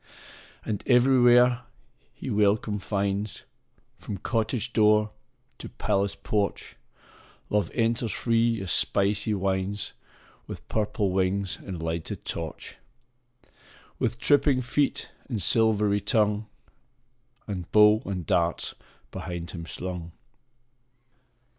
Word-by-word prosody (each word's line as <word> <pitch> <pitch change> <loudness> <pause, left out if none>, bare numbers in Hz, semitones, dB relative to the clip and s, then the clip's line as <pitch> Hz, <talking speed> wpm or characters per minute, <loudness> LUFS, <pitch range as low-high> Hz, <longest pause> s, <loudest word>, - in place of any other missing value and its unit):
And 105 -2 -2
everywhere 125 -1 +5 0.5
he 130 - -7
welcome 105 0 +1
finds, 100 +1 -2 0.6
From 100 - -6
cottage 115 +4 -2
door 105 -1 +4 0.5
to - - -7
palace 100 0 -1
porch 105 -2 -2 0.8
Love 105 -4 +1
enters 115 -1 +1
free 115 -1 +1
as 90 - -3
spicy 100 +2 +1
winds, 95 +1 -2 0.5
With - - -9
purple 105 -2 0
wings 95 +1 0
and 90 -4 -6
lighted 80 0 -4
torch, 80 -2 -6 1.2
With - - -1
tripping 140 0 +3
feet 140 +3 -1 0.2
and 115 -5 -2
silvery 105 0 +2
tongue, 105 +1 +1 1.0
And 95 -5 -6
bow 105 +1 +6
and 90 -3 -4
darts 85 +1 0 0.4
behind 85 0 -6
him 85 -2 -7
slung. 90 -2 -6
105 Hz, 100 wpm, -26 LUFS, 95-115 Hz, 1.2 s, bow